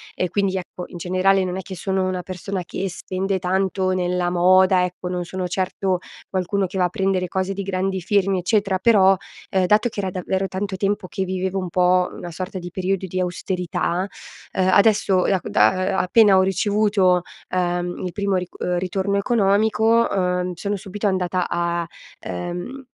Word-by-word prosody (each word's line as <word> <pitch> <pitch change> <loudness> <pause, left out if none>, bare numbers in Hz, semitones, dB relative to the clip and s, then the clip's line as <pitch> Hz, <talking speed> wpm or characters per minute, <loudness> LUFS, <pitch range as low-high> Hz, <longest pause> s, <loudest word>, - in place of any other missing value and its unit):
E 180 - 0
quindi 195 -2 0
ecco, 180 0 -7
in - - -10
generale, 185 +2 +2
non 180 0 -3
è 190 - -3
che 190 - -8
sono 190 0 -1
una 185 -1 -2
persona 185 +1 -5
che 195 - -3
spende 190 +2 -3
tanto 190 +1 0
nella 180 -1 0
moda, 185 +1 +4
ecco, 180 0 -4
non 180 0 -2
sono 185 +1 -4
certo 185 0 -1 0.3
qualcuno 190 +1 0
che 190 - -6
va 180 - +3
a 180 - +2
prendere 185 -1 0
cose 190 +1 -1
di 200 - -4
grandi 190 0 -2
firmi 195 0 +1
eccetera. 195 0 +1
Però, 195 -3 +5 0.4
uhm, 190 -1 +2
dato 210 +5 +3
che 210 -3 -4
era 190 - -2
davvero 190 +1 -2
tanto 190 +1 -3
tempo 195 0 -1
che 190 - -3
vivevo 190 +1 -2
un 185 -2 -3
po' 180 +1 +3
una 175 - -8
sorta 185 +3 -5
di 175 - -7
periodo 190 +1 -2
di 185 +1 -3
austerità, 180 0 -2 0.5
uhm 185 -1 +1
adesso 200 -2 +4
da - - +1
ehm, - - -7
da 205 - +5 0.3
a - - +4
appena 200 +1 +5
ho - - +6
ricevuto, 195 -1 +2 0.3
uhm, 175 0 -1
il 180 - -3
primo 200 -1 -1
ric 180 -1 -3 0.2
ritorno 190 +2 -1
economico, 220 +2 +3
uhm, 180 -1 0
sono 200 +4 -2
subito 200 +2 -3
andata 185 -2 0 0.2
a 170 -1 -1 0.3
ehm, 180 +10 -5
185 Hz, 180 wpm, -22 LUFS, 180-195 Hz, 0.5 s, ho